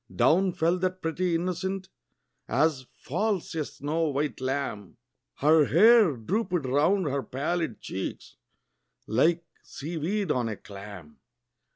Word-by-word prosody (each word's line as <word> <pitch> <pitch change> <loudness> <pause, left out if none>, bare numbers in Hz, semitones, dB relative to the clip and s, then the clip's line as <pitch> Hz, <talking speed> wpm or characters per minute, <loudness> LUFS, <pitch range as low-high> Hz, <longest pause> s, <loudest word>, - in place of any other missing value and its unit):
Down 170 +10 +4
fell 170 +3 +1
that 185 0 -2
pretty 170 +2 0
innocent, 185 +2 -2 0.6
as 135 -1 +1
falls 200 +4 -2
a 160 -2 -1
snow 155 +3 -2
white 145 0 -2
lamb, 130 -7 -3 0.4
Her 155 +1 +4
hair 210 - +6
drooped 180 - -1
round 155 +9 +2
her 140 -1 -1
pallid 150 +1 -2
cheeks, 95 - -6 0.7
like 165 +9 +2 0.2
sea 165 +4 -7
weed 190 +4 -1
on 120 -3 0
a 110 - -3
clam. 100 -7 -11
160 Hz, 125 wpm, -27 LUFS, 130-180 Hz, 0.7 s, hair